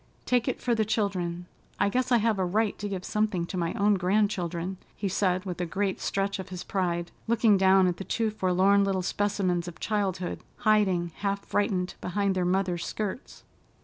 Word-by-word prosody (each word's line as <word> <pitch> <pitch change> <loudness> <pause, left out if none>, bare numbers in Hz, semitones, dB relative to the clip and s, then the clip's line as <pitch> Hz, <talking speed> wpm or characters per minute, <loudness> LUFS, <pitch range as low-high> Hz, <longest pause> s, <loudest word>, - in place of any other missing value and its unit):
Take 245 0 +2
it 255 - -1
for 245 - 0
the 220 -1 +2
children. 185 -5 -1 0.3
I - - +3
guess 255 +5 0
I 240 - +6
have 220 -2 +1
a - - +2
right 210 +4 +1
to 205 - -3
give 190 -2 -4
something 210 -5 0
to 180 - -6
my 170 +1 -1
own 205 -2 +3
grandchildren," 185 -2 0 0.2
he 200 - -2
said 185 -1 0
with 180 -2 -4
a - - 0
great 195 +3 -1
stretch 195 0 -1
of 190 - -6
his 180 -1 -6
pride, 175 -3 -1 0.2
looking 225 -2 +4
down 190 0 +5
at 180 -1 0
the - - -5
two 225 +2 -1
forlorn 195 0 +3
little 190 -2 0
specimens 185 -3 0
of 175 - -8
childhood 190 -4 -1 0.3
hiding, 190 -5 +3
half 200 0 -2
frightened, 195 -3 0
behind 200 +2 0
their 185 -1 0
mother's 180 -1 0
skirts. 215 +4 -5
195 Hz, 190 wpm, -27 LUFS, 180-210 Hz, 0.3 s, I